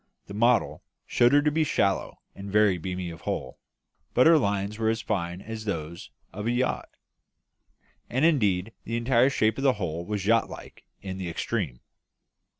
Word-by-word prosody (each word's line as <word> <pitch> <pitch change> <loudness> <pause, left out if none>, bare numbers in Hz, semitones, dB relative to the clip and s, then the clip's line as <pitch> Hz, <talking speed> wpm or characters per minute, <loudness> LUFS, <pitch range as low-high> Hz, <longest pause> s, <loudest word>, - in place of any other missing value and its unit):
The 100 - -10
model 115 +2 +2 0.2
showed 120 0 +3
her 145 +1 +5
to 150 - +2
be 160 +1 +2
shallow 100 -9 0
and 100 0 -8
very 105 -3 +3
beamy 90 +1 -4
of 80 - -11
hull; - - -4 0.6
but 125 - +5
her 165 -1 +7
lines 100 -1 -1
were 110 -1 +2
as 115 0 0
fine 90 -3 -2
as 110 -1 -7
those 85 -4 -5 0.2
of 105 +2 -4
a - - +2
yacht, 125 +1 -1 1.2
and 130 +5 +1
indeed 105 - +2
the 115 - -3
entire 120 +2 +3
shape 110 -2 +1
of - - -3
the 135 -2 +4
hull 85 -5 -4
was 100 0 -3
yacht 115 +2 +3
like - - -11 0.2
in 95 -1 -5
the 90 -2 -4
extreme. 85 - -3
105 Hz, 175 wpm, -26 LUFS, 95-120 Hz, 1.2 s, her